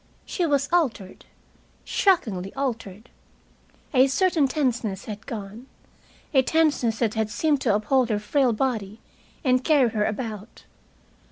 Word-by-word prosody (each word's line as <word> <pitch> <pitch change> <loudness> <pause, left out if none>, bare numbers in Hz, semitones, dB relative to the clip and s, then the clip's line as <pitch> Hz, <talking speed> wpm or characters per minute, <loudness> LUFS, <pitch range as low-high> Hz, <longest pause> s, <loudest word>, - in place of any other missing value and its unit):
She 350 -3 -1
was 280 -2 +1
altered, 240 - -1 0.6
shockingly 210 - +1
altered. 230 -5 -4 0.8
A 260 0 +5
certain 315 +1 +2
tenseness 245 -8 -2
had 215 0 -8
gone, 220 +1 -7 0.7
a 265 - +6
tenseness 285 -6 +1
that 220 -2 0
had 220 -1 -1
seemed 290 +5 0
to 220 -6 +2
uphold 245 +4 +1
her 215 - +1
frail 255 +5 +1
body 220 -3 -2 0.4
and 255 -2 +2
carry 280 -6 +4
her 210 -1 0
about. 220 -1 -5
245 Hz, 125 wpm, -24 LUFS, 215-275 Hz, 0.8 s, a